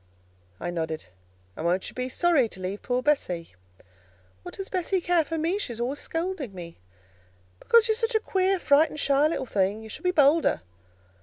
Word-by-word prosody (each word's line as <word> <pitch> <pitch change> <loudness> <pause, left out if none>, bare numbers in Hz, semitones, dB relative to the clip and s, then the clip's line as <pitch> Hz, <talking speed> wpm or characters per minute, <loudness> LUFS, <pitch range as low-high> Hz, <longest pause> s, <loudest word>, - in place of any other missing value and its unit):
I 175 - -3
nodded. 160 -2 -3 0.5
"And - - -6
won't 180 +3 0
you - - -14
be 255 0 -3
sorry 305 -5 +2
to 190 - -9
leave 185 +2 -4
poor 250 0 -1
Bessie?" 180 - 0 0.9
"What - - -8
does 390 - -5
Bessie 375 +1 0
care 350 -1 +2
for 325 +2 -4
me? 335 +6 0
She 250 - -3
is 230 - -9
always 255 +4 -2
scolding 325 - -4
me." 170 -2 -9 0.8
"Because 465 0 +4
you're 440 - +3
such 455 +1 -1
a - - +5
queer, 385 -2 +1
frightened, 305 -1 +3
shy 280 +1 +3
little 310 -4 -2
thing. 205 -1 0
You 220 - -10
should - - -8
be 360 - +1
bolder." 310 -1 +3
285 Hz, 185 wpm, -26 LUFS, -, 0.9 s, a